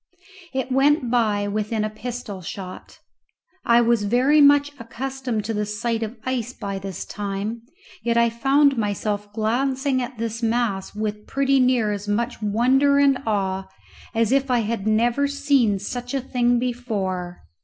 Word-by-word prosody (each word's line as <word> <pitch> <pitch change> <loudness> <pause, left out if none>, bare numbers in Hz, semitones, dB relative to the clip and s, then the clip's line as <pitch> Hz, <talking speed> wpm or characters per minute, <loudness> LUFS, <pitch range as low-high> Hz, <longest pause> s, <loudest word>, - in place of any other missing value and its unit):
It 265 -1 -3
went 270 -1 +3
by 210 -4 +1
within 215 +1 -1
a 215 - -1
pistol 215 -3 -6
shot. 185 +2 -8 0.7
I 235 0 +5
was 235 -1 +2
very 260 +8 +4
much 285 0 +5
accustomed 250 -1 -4
to 225 - -2
the 210 0 -1
sight 225 +2 -2
of 225 +2 -4
ice 250 -2 -2
by 200 -4 -5
this 195 -2 -6
time, 205 +3 -4 0.4
yet 235 +1 0
I 235 0 +4
found 275 +2 +3
myself 205 0 -2
glancing 260 +5 0
at 245 0 -6
this 230 0 -3
mass 225 -4 -1
with 210 0 -4
pretty 275 0 +2
near 250 -4 +3
as 205 0 -4
much 230 +3 -1
wonder 255 +7 +3
and 280 -2 +4
awe 195 -2 -1 0.5
as 230 0 +2
if 275 0 +2
I 245 -2 +3
had 220 -1 -3
never 235 +6 +2
seen 280 -7 +2
such 245 +6 -5
a - - +1
thing 245 -2 +1
before. 205 -8 -3
235 Hz, 155 wpm, -23 LUFS, 210-260 Hz, 0.7 s, I